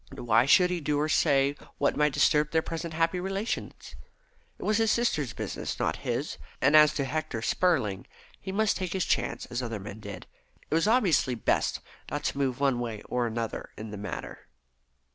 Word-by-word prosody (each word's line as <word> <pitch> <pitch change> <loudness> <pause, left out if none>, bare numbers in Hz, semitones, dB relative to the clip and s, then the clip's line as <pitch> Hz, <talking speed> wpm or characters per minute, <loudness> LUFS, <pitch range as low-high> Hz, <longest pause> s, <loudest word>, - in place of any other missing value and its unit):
Why 115 +1 +3
should 180 +5 +5
he 175 -2 -2
do 145 0 0
or 150 - +1
say 140 -3 +3 0.2
what - - +1
might 150 -1 +2
disturb 150 +2 +3
their 160 0 +1
present 165 0 -5
happy 165 +2 +1
relations? 195 +4 -4 0.6
It - - -9
was 215 0 +2
his 225 -1 +2
sister's 160 - +1
business, - - -4
not - - 0
his; - - -3 0.2
and 140 +4 +4
as 150 -1 +7
to 140 - 0
Hector 145 -5 -3
Spurling, 130 - +1 0.3
he 190 - -6
must 215 +2 +1
take 185 -3 -3
his 190 -2 0
chance - - -1
as 120 +1 -2
other 115 -3 -4
men 100 +2 -8
did. 100 -4 -8 0.5
It - - +1
was 165 +5 +3
obviously 190 - +3
best 115 - 0 0.3
not - - -3
to - - -1
move 130 -2 0
one 135 -3 +2
way 115 -3 -4
or 120 -1 0
the 115 +1 -3
other 115 - -5
in 110 0 -7
the - - -6
matter. 100 -2 -7
145 Hz, 195 wpm, -28 LUFS, 120-175 Hz, 0.6 s, as